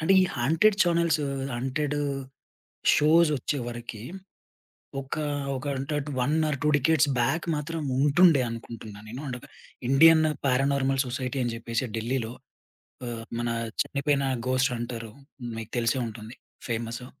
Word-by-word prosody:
అంటే, 160 +5 +3
ఈ - - +4
haunted 165 - +3
channels 170 -2 +2 0.4
haunted 140 +4 -1 1.0
షోసొచ్చేవరకి, 140 -8 +1 1.0
ఒక 135 - -5 0.4
ఒక 130 +3 -6
అనటడ్ 145 +2 -2
1 135 +4 +1 0.2
ఆర్ 140 - -1
2 150 - +3
డికేడ్స్ 150 0 +3
బాక్ 160 +8 +1
మాత్రం 160 +2 -3 0.2
ఉంటుండే 145 +1 +5
అనుకుంటున్నా 115 -2 -8
నేను. 125 +4 -6
అంటే 125 -2 -4
ఒక, - - -14 0.4
ఇండియన్ 160 +4 +7 0.2
పారానార్మల్ 135 0 +2
సొసైటీ 130 +1 -3
అని 120 - -1
జేప్పేసి 115 +2 -2
ఢిల్లీలో. 115 0 -2 0.7
ఆహ్, 115 -1 -5 0.2
మన 120 - -1 0.3
చనిపోయిన 140 0 0 0.3
ఘోస్ట్ 130 0 +2
హంటరు. 115 -2 -5 0.4
మీకు 115 0 -6
తెలిసే 115 +2 +1
ఉంటుంది. 110 +2 -8 0.3
ఫేమసు. 115 +2 -3
135 Hz, 120 wpm, -27 LUFS, 120-150 Hz, 1.0 s, ఇండియన్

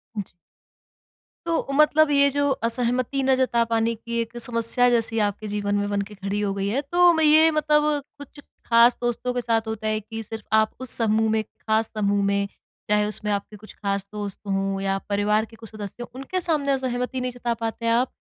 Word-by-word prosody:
जी। 205 -3 -5 1.2
तो 335 -1 0
मतलब 305 +1 +4
ये 280 0 +4
जो 285 +1 0 0.2
असहमति 250 +3 -1
ना 265 0 +3
जता 255 -2 +2
पाने 230 0 0
की 235 +1 -5
एक 230 +1 -7
समस्या, 235 +1 +3
जैसी 225 -1 +1
आपके 210 +2 -6
जीवन 205 0 -2
में 205 0 -1
बन 200 0 0
के 210 - -11
खड़ी 195 +1 -3
हो 200 -1 -1
गई 195 0 -2
है 255 +7 0
तो 350 0 +5
मैं 320 -1 +1
ये 315 +2 +6
मतलब 300 -1 +2 0.3
कुछ 285 +1 -12 0.3
खास 235 +1 +5
दोस्तों 240 +1 -2
के 245 - -1
साथ 225 -1 0
होता 220 0 -4
है 215 0 0
कि 225 +1 -7
सिर्फ़ 220 0 -8
आप 220 0 +2
उस 260 - -5
समूह 220 -1 +2
में 220 - +2
खास 220 +1 -2
समूह 205 -1 +1
में 200 0 +1 0.4
चाहे 210 0 +3
उसमें 210 0 +3
आपके 205 +1 -3
कुछ 215 +1 -14
खास 200 -1 -3
दोस्त 205 -2 -5
हों 195 0 -1
या 195 0 0
परिवार 210 +2 +1
के 225 +1 -17
कुछ 225 -1 -12
सदस्य, 215 +2 -8
उनके 275 +8 -4
सामने 300 -5 0
असहमति 255 -1 -2
नहीं 250 0 -2
जता 240 -1 -2
पाते 230 0 -5
हैं 230 - +3
आप? 250 +2 +1
225 Hz, 205 wpm, -24 LUFS, 210-255 Hz, 1.2 s, ये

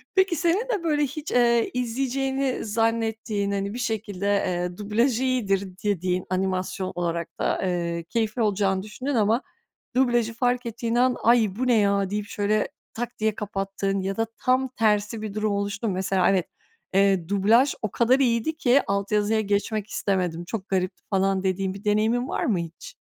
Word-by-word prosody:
Peki, 380 -2 +3
senin 350 +10 +1
de 415 -8 -1
böyle 300 -3 +2
hiç, 295 +2 -4
eee, 235 -1 +3
izleyeceğini 265 +2 -1
zannettiğin, 225 -2 0
hani, 200 0 -2
bir 240 - -5
şekilde, 215 -4 -3
eee, 180 -3 0
dublaj 220 +4 +1
iyidir 200 -7 0
dediğin, 185 -3 0
animasyon 185 0 -1
olarak 170 -1 -3
da, - - 0
ııı, 170 -2 -1
keyifli 220 +6 -1
olacağını 195 -3 +1
düşündüğün 255 +7 -4
ama 225 +2 +3 0.5
dublajı 240 -3 +2
fark 245 +1 0
ettiğin 230 0 -2
an, 250 +1 +3
“Ay, 225 -4 +4
bu 255 +4 -1
ne 245 - +4
ya?” 200 -2 +2
deyip, 205 +1 -2
şöyle 210 +1 0 0.3
tak 240 +1 -5
diye 215 -1 +1
kapattığın 195 -1 -2
ya 195 +1 -3
da 225 0 0
tam 255 +1 +2
tersi 215 -2 +1
bir 215 -2 -5
durum 215 0 0
oluştu 200 +2 -2
mu? 200 - 0
Mesela, 190 0 +2
evet, 190 -3 +1 0.5
eee, 195 -3 +3
dublaj 220 +7 +4
o 215 - -2
kadar 250 +3 +3
iyiydi 245 +4 +1
ki 270 -1 +4
alt 200 +1 -1
yazıya 210 +1 +2
geçmek 205 +1 -1
istemedim, 180 -5 -1
çok 195 +1 -5
garipti, 185 -1 -1
falan 195 -1 +1
dediğin 190 0 0
bir 195 +1 -10
deneyimin 220 +4 +1
var - - -1
mı 215 - +1
hiç? 170 -1 -8
210 Hz, 170 wpm, -25 LUFS, 195-240 Hz, 0.5 s, Ay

